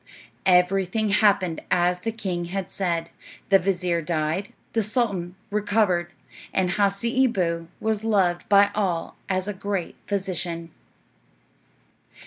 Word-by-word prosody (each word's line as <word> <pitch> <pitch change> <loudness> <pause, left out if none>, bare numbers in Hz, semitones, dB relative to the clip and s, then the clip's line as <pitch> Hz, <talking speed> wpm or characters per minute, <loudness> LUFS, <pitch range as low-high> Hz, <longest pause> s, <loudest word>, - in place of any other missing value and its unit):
Everything 190 +3 +3
happened 200 -5 +3
as 180 0 +2
the 225 +5 -2
king 190 -6 -3
had 190 +1 -4
said. 170 -3 -2 0.4
The 195 0 +6
vizir 180 -2 0
died, 160 +4 -1 0.2
the 225 - +2
sultan 200 -5 -1 0.2
recovered, 200 -4 +1 0.4
and 185 -2 +1
Hasseeboo 200 -4 +1
was 220 -1 -1
loved 195 -6 +1
by 200 0 +6
all 185 -6 -1
as 185 0 0
a 205 - -2
great 195 -2 -3
physician. 175 -4 -2
190 Hz, 115 wpm, -24 LUFS, 175-205 Hz, 0.4 s, The